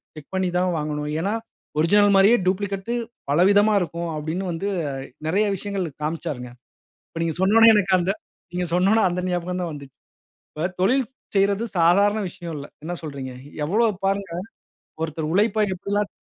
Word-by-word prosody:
Check 155 -2 -12
பண்ணி 190 -1 +1
தான் 180 0 +2
வாங்கனும். 150 -1 -2
ஏனா, 195 +5 0 0.5
ஒரிஜினல் 205 +6 +5
மாரியே 200 +5 +6
டூப்ளிகேட் 195 +3 -1 0.4
பலவிதமா 200 +7 +5
இருக்கும். 170 -1 -3
அப்படினு 160 +5 -3
வந்து 170 +4 -3 0.6
நிறைய 195 +7 +2
விஷயங்கள் 195 -1 -3 0.2
காம்ச்சாருங்க. 150 -5 -3 0.6
இப்போ 165 - -8
நீங்க 165 -2 -1
சொன்னோனே 225 +4 +7
எனக்கு 195 -2 +2
அந்த 180 +2 +1 0.4
நீங்க 180 0 -1
சொன்னோனே 195 +5 +4
அந்த 180 +1 -2
ஞாபகம் 180 +1 -2
தான் 175 -2 -3
வந்திச்சு. 140 -2 -11 0.5
இப்போ, 155 - -4 0.2
தொழில் 250 +6 +3 0.3
செய்றது 200 +2 +2
சாதாரண 200 +5 +4
விஷயம் 170 -1 -7
இல்ல, 140 - -6 0.2
என்ன 175 - -3
சொல்றீங்க? 140 -4 -6 0.3
எவ்வளவு 210 +3 +1
பாருங்க, 195 -1 -1 0.7
ஒருத்தர் 155 -1 -3
உழைப்பை 215 +3 +3
எப்டி 185 +2 -8
எல்லாம் 205 0 +1
180 Hz, 150 wpm, -23 LUFS, 165-200 Hz, 0.7 s, சொன்னோனே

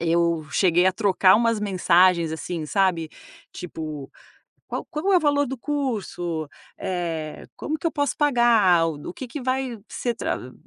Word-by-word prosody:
Eu 170 -1 +1
cheguei 180 -1 +3
a 185 - +4
trocar 190 -2 +4
umas 230 0 +2
mensagens, 180 -4 +3
assim, 160 0 -4
sabe. 180 -2 +1 0.4
Tipo, 155 -5 -7 0.6
qual - - -4
qual 350 +5 0
é - - +6
o 355 - +4
valor 285 -1 +2
do 265 +2 -5
curso? 205 - -3 0.3
Eh, 165 -4 -4
como 310 +1 -3
que - - -3
eu 330 - 0
posso 285 -1 -1
pagar? 235 - +4
O 155 -3 -5
do - - -7
o - - -10
que 260 - -7
que 285 +4 -6
vai 255 -2 -2
ser 240 -1 -2
tra 130 - -4
185 Hz, 170 wpm, -24 LUFS, 165-255 Hz, 0.6 s, é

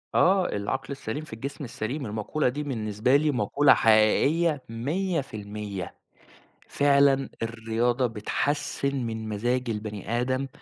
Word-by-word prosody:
آه، 190 0 +4
العقل 135 +7 -3
السليم 140 +1 -4
في 155 - -10
الجسم 140 +6 -6
السليم، 125 +3 -4
المَقولة 110 +7 -1
دي 145 +4 -4
بالنسبة 115 -2 0
لي 150 +1 +3
مَقولة 135 +4 +4
حقيقية 135 +8 +3
100%، 115 - -3 0.7
فعلًا 140 -1 +3
الرياضة 115 +2 0
بتحسِّن 140 +5 -1
من 110 -1 -5
مزاج 120 +4 -1
البَني 105 +1 -3
آدم، 130 +2 -1
125 Hz, 115 wpm, -26 LUFS, 110-140 Hz, 0.7 s, آه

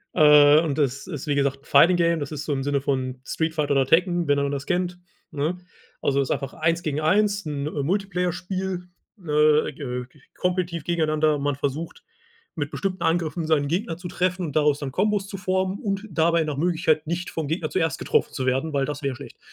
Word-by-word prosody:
Äh, 150 0 +7
und 155 -4 -2
das 135 0 -1
ist 150 -4 -6
wie 145 - +1
gesagt, 140 -1 0
'n - - -25
Fighting-Game, 170 +2 +4
das 145 +1 -5
ist 150 +1 -5
so 145 - -1
im 135 -1 -2
Sinne 140 -1 0
von 130 -2 -2
Street 160 +2 -2
Fighter 150 -3 -1
oder 135 -1 +3
Tekken, 175 +2 +2
wenn 145 0 +3
einer 140 0 0
das 140 0 -4
kennt, 180 0 -1 0.3
ne? 150 +4 -2 0.4
Also, 140 0 +1
ist 135 - -2
einfach 135 -1 -2
1 165 +2 0
gegen 150 -1 -1
1, 200 +4 +2
'n 145 -2 -3
Multiplayer-Spiel, 180 +3 -2 0.4
äh, 150 0 +4
äh, 125 -4 -5
k 130 +3 -24 0.2
kompetitiv 180 -3 -1
gegeneinander. 155 -3 +1
Man 145 -1 0
versucht, 145 +4 -4 0.5
mit 145 -1 -3
bestimmten 195 -1 -3
Angriffen 165 0 0
seinen 145 -3 +2
Gegner 175 0 -1
zu 175 0 -8
treffen 180 -1 -1
und 145 - -8
daraus 150 -1 +3
dann 140 -3 -4
Kombos 200 +3 0
zu 195 - -6
formen 185 +1 -1
und 200 0 -3
dabei 165 +1 +2
nach 150 -3 -4
Möglichkeit, 160 -1 +1
nicht 175 +2 -3
vom 160 -3 -4
Gegner 160 +1 -2
zuerst 160 -6 0
getroffen - - 0
zu 130 - -3
werden, 135 +4 0
weil 140 - +1
das 145 0 -5
wäre 135 -2 -1
schlecht. 130 -2 -11
155 Hz, 205 wpm, -24 LUFS, 145-180 Hz, 0.5 s, Äh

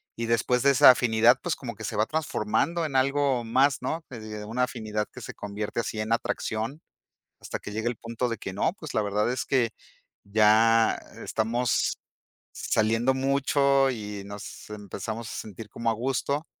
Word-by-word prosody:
y 115 - -3
después 115 +2 +1
de 140 - +6
esa 140 +1 +8
afinidad, 120 0 +4
pues, 175 -3 -1
como 120 -3 -7
que 110 - -7
se - - -4
va 110 - +2
transformando 160 +3 -1
en 140 -4 -1
algo 135 -2 +2
más, 130 +4 +3
¿no?, 160 +6 -3
que 120 - -8
de 110 -1 -7
una 115 +4 -1
afinidad 110 -4 -2
que 130 - -9
se - - -7
convierte 105 +2 -4
así 110 -1 -3
en 110 +1 -4
atracción 115 +3 -2 0.6
hasta - - -5
que - - -8
llegue 110 +2 -2
el 120 - -3
punto 115 +2 -3
de 115 - -3
que 95 - -6
no. 100 - 0
Pues 155 -7 -9
la 110 - +2
verdad 105 +3 0
es 130 - -2
que 125 -4 +1 0.5
ya 110 +2 +4 0.2
estamos 115 +2 0 0.6
saliendo 115 +4 +1
mucho, 140 0 +2
y 105 -3 -6
nos 100 +1 -9
empezamos 105 +2 -6
a - - -5
sentir 110 +1 -8
como 115 +2 -3
a - - 0
gusto, 135 +6 -1
115 Hz, 180 wpm, -27 LUFS, 110-130 Hz, 0.6 s, esa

